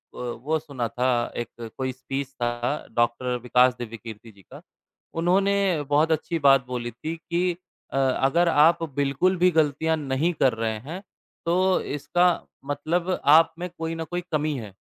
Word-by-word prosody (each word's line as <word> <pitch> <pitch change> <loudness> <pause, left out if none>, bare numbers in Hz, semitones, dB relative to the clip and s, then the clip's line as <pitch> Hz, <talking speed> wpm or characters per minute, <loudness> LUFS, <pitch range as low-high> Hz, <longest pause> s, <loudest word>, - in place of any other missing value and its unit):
व 125 -1 -4
वो 160 +3 +1
सुना 140 -6 -4
था 125 +3 -1 0.3
एक 120 - -2 0.3
कोई 130 -1 -2
स्पीच 135 +2 -5
था 120 - +2 0.5
डॉक्टर 120 +1 +1
विकास 125 0 +4
दिव्यकीर्ति 115 -1 -8
जी 100 - -20
का, - - -14 0.5
उन्होंने 185 +4 +2 0.4
बहुत 150 +3 +3
अच्छी 160 +2 -1
बात 135 -3 +5
बोली 120 -1 -4
थी 155 +8 -5
कि 175 +2 -1 0.4
अ, - - -1
"अगर 135 +6 +2
आप 165 +2 +4
बिल्कुल 145 +7 +1
भी 180 +1 +5
गलतियाँ 160 +1 +1
नहीं 145 +4 0
कर 130 -3 +4
रहे 110 -1 -2
हैं, 165 - -7 0.4
तो 185 +2 +2
इसका 150 +5 0 0.4
मतलब 170 +6 -1 0.2
आप 165 0 +5
में 180 - -4
कोई 165 0 -3
न 165 - -4
कोई 175 0 -1
कमी 155 0 0
है।" 105 -5 -8
145 Hz, 160 wpm, -25 LUFS, 125-165 Hz, 0.5 s, बात